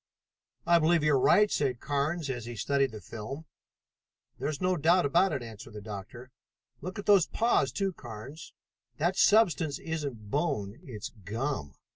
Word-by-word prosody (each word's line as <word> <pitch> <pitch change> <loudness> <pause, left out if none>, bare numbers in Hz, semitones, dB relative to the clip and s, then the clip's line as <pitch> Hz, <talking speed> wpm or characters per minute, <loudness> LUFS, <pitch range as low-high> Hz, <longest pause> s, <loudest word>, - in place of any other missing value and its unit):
"I 170 0 +5
believe 165 0 +3
you're 150 -3 +4
right," 210 +10 +5
said 130 -4 0
Carnes 150 +3 -1
as 120 -4 -4
he 120 0 -6
studied 135 +5 +1
the 110 -1 -9
film. 135 +8 -7 0.9
"There - - -1
is 150 -2 -4
no 185 0 +1
doubt 170 +2 +3
of 140 - -3
it," 175 -8 +3
answered 110 -1 -10
the 105 - -7
doctor. 110 +4 -8 0.5
"Look 185 +5 -6
at 205 - -5
those 200 -5 +5
paws, 225 - +2
too, 195 +4 -1
Carnes. 120 +4 -9 0.5
That 175 +5 +1
substance 185 -9 +4
isn't 140 -10 -5
bone, 135 -9 -1
it's 110 -6 -7
gum. 110 - -3
140 Hz, 160 wpm, -29 LUFS, 115-170 Hz, 0.9 s, I